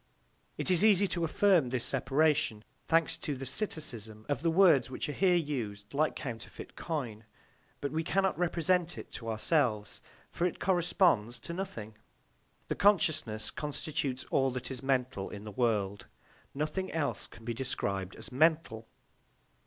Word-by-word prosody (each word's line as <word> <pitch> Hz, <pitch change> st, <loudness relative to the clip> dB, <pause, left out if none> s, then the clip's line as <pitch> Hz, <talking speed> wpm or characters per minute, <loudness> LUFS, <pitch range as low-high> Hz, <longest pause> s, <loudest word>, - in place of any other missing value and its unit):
It -, -, 0 dB
is 180 Hz, +2 st, +4 dB
easy 205 Hz, -2 st, +5 dB
to 170 Hz, -, -1 dB
affirm 165 Hz, -3 st, +3 dB
this 125 Hz, -1 st, -1 dB
separation, 135 Hz, -4 st, +2 dB, 0.2 s
thanks 165 Hz, -2 st, +3 dB
to 145 Hz, -, -3 dB
the 135 Hz, +1 st, -6 dB
psittacism 120 Hz, -, -2 dB
of 145 Hz, -1 st, -1 dB
the 165 Hz, -, +2 dB
words, 165 Hz, -6 st, +5 dB
which 130 Hz, -, -4 dB
are -, -, -2 dB
here 185 Hz, +1 st, +3 dB
used 115 Hz, -11 st, -3 dB
like 155 Hz, +2 st, +1 dB
counterfeit 115 Hz, -6 st, -7 dB
coin, 125 Hz, -10 st, -4 dB, 0.6 s
but 140 Hz, -, -2 dB
we 160 Hz, +2 st, -1 dB
cannot 190 Hz, +3 st, +1 dB
represent 175 Hz, 0 st, +1 dB
it -, -, -9 dB
to 115 Hz, -, -6 dB
ourselves, 110 Hz, -2 st, 0 dB, 0.3 s
for 175 Hz, -, +1 dB
it 180 Hz, -, -6 dB
corresponds 175 Hz, -, +2 dB
to 170 Hz, -, -6 dB
nothing. 115 Hz, -, -5 dB, 0.7 s
The -, -, 0 dB
consciousness 155 Hz, -, +2 dB
constitutes 150 Hz, -2 st, -3 dB
all 135 Hz, -1 st, +3 dB
that 125 Hz, +1 st, -5 dB
is 130 Hz, -2 st, -5 dB
mental 130 Hz, -6 st, 0 dB
in 105 Hz, -1 st, -8 dB
the 105 Hz, -, -7 dB
world; 105 Hz, -4 st, 0 dB, 0.5 s
nothing 155 Hz, +6 st, -2 dB
else 155 Hz, -3 st, -1 dB
can 115 Hz, -, -15 dB
be 120 Hz, -, -2 dB
described 100 Hz, -6 st, -3 dB
as 110 Hz, -, -9 dB
mental. 155 Hz, -5 st, +2 dB
140 Hz, 155 wpm, -31 LUFS, 115-165 Hz, 0.7 s, easy